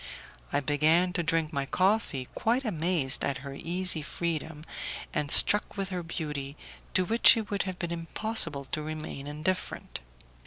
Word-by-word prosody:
I - - +2
began 155 +6 +3
to 180 - 0
drink 165 -1 0
my 140 -1 -1
coffee, 185 - +1
quite 245 +4 0
amazed 165 - +1
at 140 - 0
her 140 - -6
easy 175 +2 +1
freedom, 160 -1 -4 0.5
and 150 -1 -1
struck 210 +7 +5
with 195 -1 -2
her 180 -2 -3
beauty, 150 -4 -5 0.4
to 185 - +3
which 230 +3 +6
it 220 -1 -4
would 200 - 0
have 185 - -6
been 170 -1 -3
impossible 165 -3 -2
to 150 - -3
remain 155 -2 -6
indifferent. 155 +6 -3
165 Hz, 155 wpm, -29 LUFS, 150-185 Hz, 0.5 s, which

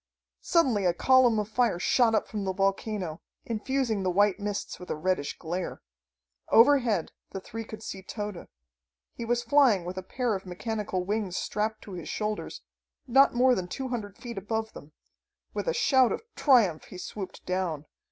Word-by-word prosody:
Suddenly 260 - +2
a 175 -1 +2
column 255 0 +5
of 210 -1 -1
fire 225 -3 +1
shot 225 +5 +3
up 215 - 0
from 210 -2 -4
the 190 -1 -1
volcano, 195 -3 -1 0.2
infusing 230 -1 -1
the 185 - 0
white 200 +2 +3
mists 205 0 -4
with 180 - -10
a - - -1
reddish 165 -2 -1
glare. 175 +2 -4 0.7
Overhead 235 - +4 0.2
the 195 - -5
three 225 +4 -7
could 220 0 -9
see 190 - -6
Tode. 205 -1 -6 0.7
He 235 - -6
was 240 +1 0
flying 235 -8 +4
with 180 +1 -5
a - - -5
pair 240 +5 -2
of 190 -1 -3
mechanical 190 0 -3
wings 200 -2 -2
strapped 215 +1 -2
to 205 - -10
his 175 -3 -7
shoulders, 210 0 -3 0.4
not 270 +1 +5
more 255 +1 +5
than 185 -6 -2
two 260 +8 -5
hundred 205 -5 -5
feet 235 -4 -6
above 220 +2 -3
them. 145 - -12 0.6
With - - -3
a - - +3
shout 265 - +4
of - - -3
triumph 225 - +4
he 185 - -10
swooped 190 +1 -7
down. 180 -5 -2
210 Hz, 175 wpm, -28 LUFS, 185-240 Hz, 0.7 s, column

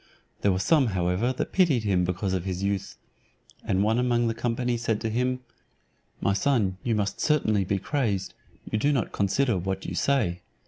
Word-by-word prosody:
There 100 - +3
were 90 - +1
some, 140 - +3
however, 90 +8 +1
that 130 - -3
pitied 160 - +3
him 95 -4 +2
because 90 +2 -2
of 95 -2 -1
his 95 0 -3
youth; 100 -1 -2 0.7
and 95 0 +1
one 110 +3 +2
among 120 -1 +2
the 115 - 0
company 120 +1 -1
said 115 -2 -1
to 110 -1 -2
him, 125 +2 0 0.8
"My 100 - +1
son, 100 -4 +1
you 115 -2 +1
must 100 -2 -2
certainly 110 -10 +2
be 100 +2 0
crazed, 100 -4 -1 0.4
you 110 - +1
do 145 +6 +2
not 130 -6 0
consider 105 +2 +1
what 95 +1 -3
you - - -4
say. 110 -11 +1
110 Hz, 185 wpm, -26 LUFS, 95-125 Hz, 0.8 s, There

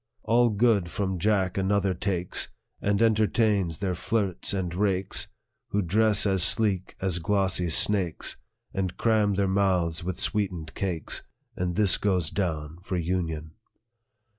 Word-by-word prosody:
" - - -44
All 120 +2 +3
good 105 -4 +2
from 95 -1 -2
Jack 95 -1 +1
another 95 0 +1
takes, 90 0 -1 0.3
And 100 +2 +1
entertains 105 -5 +2
their 95 0 -2
flirts 100 +1 -1
and 95 -4 -2
rakes, 95 +1 0 0.4
Who 100 0 0
dress 105 +4 +2
as 95 -2 +2
sleek 95 0 +2
as 95 -2 0
glossy 95 0 +1
snakes, 90 0 +2 0.4
And 95 -2 -2
cram 110 -3 +2
their 100 0 +1
mouths 90 -4 +1
with 90 0 -4
sweetened 90 -7 -1
cakes; 90 -6 -3 0.3
And 90 -1 -2
this 105 -3 +4
goes 90 -7 0
down 80 -4 -3
for 90 0 -3
union." 80 -3 -2
95 Hz, 140 wpm, -26 LUFS, 90-105 Hz, 0.4 s, this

